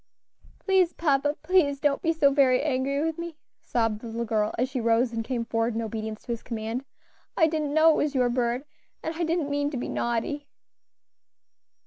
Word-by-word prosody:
"Please, 375 -3 +2
papa, 290 -2 +1
please 310 -7 +3
don't 280 0 +1
be 330 - +2
so 300 -4 +3
very 260 -3 +4
angry 275 0 0
with 325 0 -2
me," 335 -2 -6 0.2
sobbed 225 -3 -1
the 235 - -7
little 230 +1 -3
girl, 215 -1 0
as 250 - +1
she 260 -2 -3
rose 230 +1 +2
and 225 0 -2
came 235 -1 -2
forward 225 0 0
in 230 - -1
obedience 220 0 -5
to - - -5
his 235 - -3
command; 230 +2 -4 0.5
"I 320 - +6
didn't 305 -2 -1
know 320 +1 +7
it - - +1
was 295 -1 0
your 250 -2 +3
bird, 240 +2 0 0.4
and 320 - -2
I 335 +1 -2
didn't 325 -3 0
mean 285 0 0
to 285 - -4
be 245 - -4
naughty." 240 +5 -2
270 Hz, 195 wpm, -26 LUFS, 230-300 Hz, 0.5 s, know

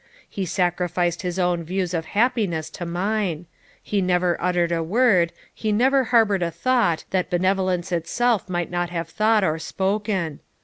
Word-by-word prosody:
he 195 -2 -4
sacrificed 175 -1 0
his 180 -1 -3
own 175 -2 +1
views 180 +1 -2
of 165 -2 -2
happiness 205 -9 +1
to 175 - -6
mine; 180 -1 -1 0.4
he 205 -2 0
never 180 -1 +2
uttered 175 -1 +1
a 165 -1 0
word, 185 -2 +3 0.2
he 215 - -2
never 260 +5 +3
harboured 220 -5 +3
a 170 - +1
thought, 175 -1 +1
that 185 -1 0
benevolence 185 0 0
itself 200 +6 0
might 175 -1 -2
not 175 0 -1
have 170 -2 -3
thought 215 +4 +2
or 160 -3 0
spoken. 190 -3 -2
180 Hz, 160 wpm, -23 LUFS, 170-210 Hz, 0.4 s, word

